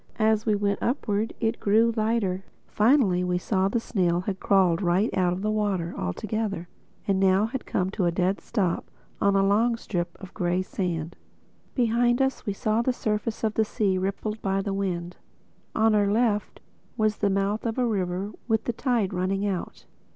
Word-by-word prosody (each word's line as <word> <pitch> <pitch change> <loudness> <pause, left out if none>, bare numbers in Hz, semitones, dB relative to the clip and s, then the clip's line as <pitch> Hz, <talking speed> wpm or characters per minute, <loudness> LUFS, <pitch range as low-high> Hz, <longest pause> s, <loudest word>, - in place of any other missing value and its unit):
As 220 0 +2
we 215 - +4
went 200 0 0
upward 225 -4 -1
it 225 0 0
grew 225 +3 +3
lighter. 215 -4 0 0.2
Finally 215 -6 +3
we 180 0 0
saw 190 +1 0
that 200 - -5
the 235 - +2
snail 180 -6 0
had 190 0 -4
crawled 190 -3 +3
right 185 +4 +1
out 180 -2 +2
of 180 +2 -3
the 215 - +1
water 200 -5 -1
altogether 200 - -3 0.4
and 195 -1 +2
had 190 - +6
now 200 +4 +2 0.2
come 185 0 0
to 195 -3 -1
a 170 - +2
dead 185 +3 0
stop 190 -7 -1 0.3
on 200 0 +3
a 195 0 +4
long 225 +4 +3
strip 175 -6 -4
of 190 0 -11
gray 180 -1 0
sand. 170 -4 -3 0.6
Behind 240 0 +2
us 265 -3 0
we 205 - 0
saw 215 +3 0
the 255 - +1
surface 215 -1 -2
of 215 -1 +1
the 220 - +2
sea 200 -3 0
rippled 205 +3 -3
by 195 0 0
the 195 0 -2
wind. 180 -3 -3 0.6
On 220 0 +4
our 205 -1 +3
left 215 -2 0 0.4
was 215 -1 +1
the 205 - +1
mouth 195 +2 0
of 230 0 -2
a 250 - +2
river 195 -2 -1 0.2
with 220 -2 +1
the 240 - -2
tide 225 -6 0
running 190 +2 0
out. 190 -3 -4
200 Hz, 190 wpm, -26 LUFS, 185-220 Hz, 0.6 s, had